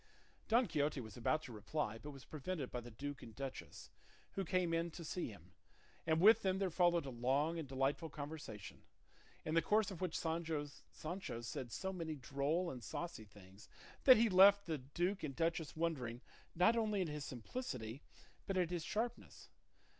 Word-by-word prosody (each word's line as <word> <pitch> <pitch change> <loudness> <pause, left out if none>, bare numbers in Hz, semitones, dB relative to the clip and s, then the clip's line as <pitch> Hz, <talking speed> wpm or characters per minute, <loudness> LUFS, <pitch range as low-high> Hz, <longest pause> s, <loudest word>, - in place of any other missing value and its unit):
Don 235 +3 +5
Quixote 150 -5 0
was 110 -5 -8
about 155 +6 +1
to 130 - -8
reply, 110 +1 -2
but 150 - -8
was 135 -3 -10
prevented 155 -2 -4
by 125 - -3
the 120 - -9
duke 140 +4 -6
and 115 - -10
duchess, 135 -1 -7 0.4
who 195 - -2
came 180 -1 +1
in 165 +1 +1
to 170 0 -8
see 180 +4 -2
him, 90 -5 -12 0.6
and 160 0 +3
with 220 +5 +8
them 190 -1 +1
there 190 -2 0
followed 175 -2 +3
a 135 - -4
long 135 +7 +1
and 155 - -4
delightful 135 +5 0
conversation, 145 -8 -7 0.6
in 155 - -1
the 165 - +5
course 210 +4 +3
of 185 - -7
which 180 -3 -1
Sancho 160 -2 -4
said 120 +1 -5
so 190 - -3
many 165 -4 -3
droll 145 +6 0
and 125 -2 -8
saucy 170 -11 -5
things 100 0 -15 0.4
that 255 -2 +11
he 230 +1 +5
left 200 +1 +7
the 160 -3 -2
duke 175 +9 -1
and 140 -3 -4
duchess 165 -1 0
wondering 135 -8 -1 0.3
not 200 +7 +5
only 215 -3 +1
at - - -3
his 150 -1 -4
simplicity 125 - -5 0.5
but 195 - 0
at 180 -2 +2
his 175 -2 -1
sharpness. 225 +6 -3
155 Hz, 180 wpm, -38 LUFS, 130-180 Hz, 0.6 s, that